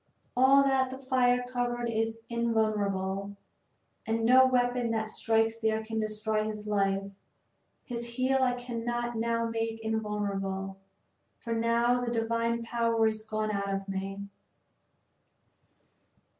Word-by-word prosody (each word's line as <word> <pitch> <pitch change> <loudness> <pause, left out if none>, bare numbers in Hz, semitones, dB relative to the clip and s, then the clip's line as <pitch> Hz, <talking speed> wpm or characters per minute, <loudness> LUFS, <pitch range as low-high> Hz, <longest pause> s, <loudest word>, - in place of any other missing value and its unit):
All 265 +2 +6
that 265 -1 +2
the 260 - -6
fire 250 -2 +2
covered 245 -1 -2
is 225 0 -1
invulnerable, 205 -4 -1 0.7
and 225 0 0
no 260 +2 +7
weapon 245 -1 +1
that 220 -1 -1
strikes 225 0 +1
there 220 0 0
can 220 0 -3
destroy 215 0 -1
his 215 -1 -5
life. 195 -1 0 0.7
His 235 -1 -5
heel 260 +2 +2
I 250 -1 +2
cannot 240 0 -3
now 230 0 0
make 225 0 -2
invulnerable, 200 -3 -2 0.6
for 230 - -4
now 235 +2 +2
the 240 - -1
divine 230 0 0
power 230 -1 +1
is 215 0 0
gone 215 0 -2
out 200 -1 -2
of 195 0 -5
me." 195 +1 -4
225 Hz, 125 wpm, -29 LUFS, 215-240 Hz, 0.7 s, no